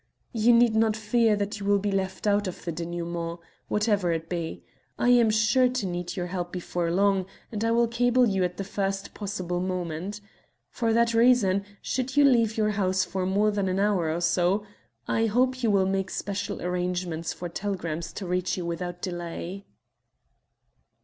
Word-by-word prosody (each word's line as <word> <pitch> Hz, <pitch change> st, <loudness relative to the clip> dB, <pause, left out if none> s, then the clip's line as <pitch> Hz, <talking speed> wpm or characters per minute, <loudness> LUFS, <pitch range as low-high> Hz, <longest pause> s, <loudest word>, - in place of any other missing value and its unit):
"You 230 Hz, +1 st, +4 dB
need 235 Hz, -1 st, +5 dB
not 220 Hz, -1 st, +3 dB
fear 220 Hz, 0 st, +2 dB
that 205 Hz, +1 st, -3 dB
you 200 Hz, -, -5 dB
will 205 Hz, 0 st, +4 dB
be 200 Hz, +1 st, -1 dB
left 190 Hz, 0 st, -2 dB
out 205 Hz, -1 st, +2 dB
of 185 Hz, -, -7 dB
the 170 Hz, -, -1 dB
denouement, 170 Hz, 0 st, -4 dB, 0.3 s
whatever 210 Hz, -4 st, +1 dB
it 165 Hz, 0 st, -3 dB
be. 170 Hz, -2 st, -4 dB, 0.3 s
I 245 Hz, -, +2 dB
am 240 Hz, -2 st, +6 dB
sure 220 Hz, +4 st, +3 dB
to 250 Hz, -4 st, -2 dB
need 175 Hz, -1 st, -4 dB
your 180 Hz, -3 st, -2 dB
help 175 Hz, -1 st, -4 dB
before 175 Hz, -1 st, -2 dB
long, 190 Hz, +1 st, +2 dB, 0.2 s
and 215 Hz, -1 st, -3 dB
I 230 Hz, -, +2 dB
will 235 Hz, +1 st, +3 dB
cable 245 Hz, +2 st, +3 dB
you 195 Hz, -3 st, +1 dB
at 180 Hz, 0 st, -2 dB
the 195 Hz, -, -3 dB
first 195 Hz, 0 st, -3 dB
possible 185 Hz, -4 st, -3 dB
moment. 180 Hz, +2 st, -3 dB, 0.5 s
For 230 Hz, -2 st, 0 dB
that 230 Hz, +1 st, +3 dB
reason, 225 Hz, -5 st, +4 dB, 0.2 s
should 260 Hz, +2 st, -2 dB
you 290 Hz, -, +7 dB
leave 230 Hz, -5 st, +3 dB
your 215 Hz, -1 st, +2 dB
house 190 Hz, -2 st, +1 dB
for 185 Hz, -1 st, -2 dB
more 205 Hz, +3 st, +2 dB
than 190 Hz, -2 st, -1 dB
hour 195 Hz, -5 st, +1 dB
or 170 Hz, +2 st, -2 dB
so, 175 Hz, +4 st, +2 dB, 0.4 s
I 225 Hz, 0 st, +2 dB
hope 255 Hz, +4 st, +1 dB
you 230 Hz, -, +2 dB
will 195 Hz, -2 st, +3 dB
make 190 Hz, 0 st, -1 dB
special 200 Hz, -3 st, -4 dB
arrangements 180 Hz, -2 st, -2 dB
for 175 Hz, -, -6 dB
telegrams 170 Hz, -3 st, -4 dB
to 200 Hz, -, -6 dB
reach 180 Hz, +1 st, -1 dB
you 180 Hz, -, -3 dB
without 175 Hz, +1 st, -4 dB
delay." 175 Hz, +2 st, -5 dB
195 Hz, 180 wpm, -26 LUFS, 180-220 Hz, 0.5 s, you